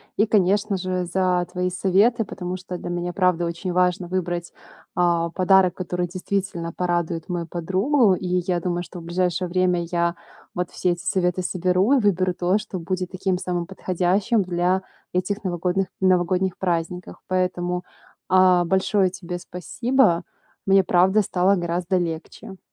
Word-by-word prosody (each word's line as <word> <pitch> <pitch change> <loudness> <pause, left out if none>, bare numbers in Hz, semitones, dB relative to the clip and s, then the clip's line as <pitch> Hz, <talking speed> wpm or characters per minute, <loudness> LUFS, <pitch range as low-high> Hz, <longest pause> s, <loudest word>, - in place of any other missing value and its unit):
И 210 - +3
конечно 205 0 +2
же, 185 0 -2
за 180 0 +1
твои 180 0 -1
советы. 200 +6 +2
Потому 185 -2 -5
что 185 -1 -6
для 175 - -7
меня 175 0 -2
правда 180 -2 +1
очень 170 +2 -4
важно 180 0 +1
выбрать, 175 -1 -3 0.4
э, 170 -1 +2
подарок, 185 -1 +4
который 180 -1 -3
действительно 180 -2 -3
порадует 175 -2 -2
мою 175 -2 -3
подругу. 190 - +2
И 180 0 -1
я 175 -2 0
думаю, 175 0 -1
что 175 - -9
в - - -11
ближайшее 180 +1 -1
время 180 -1 +1
я 170 0 +1 0.4
вот 180 -1 -2
все 180 - 0
эти 175 0 -4
советы 180 -1 0
соберу 185 +7 +2
и - - +3
выберу 185 -3 +2
то, 180 +3 +1
что 205 -3 -6
будет 180 +1 -3
таким 185 -1 -1
самым 175 -1 -2
подходящим 190 +4 0
для 180 +1 0 0.3
этих 200 +4 -1
новогодных 180 +1 -1
новогодних 185 0 +2
праздниках. 180 0 -3
Поэтому, 180 -1 -1 0.5
э, 185 -1 +5
большое 190 +1 +2
тебе 180 -1 -6
спасибо. 180 +3 +1 0.4
Мне 195 0 +5
правда 185 +4 +4
стало 190 +2 +2
гораздо 175 +1 -1
легче. 175 +4 -5
180 Hz, 150 wpm, -23 LUFS, 175-190 Hz, 0.5 s, э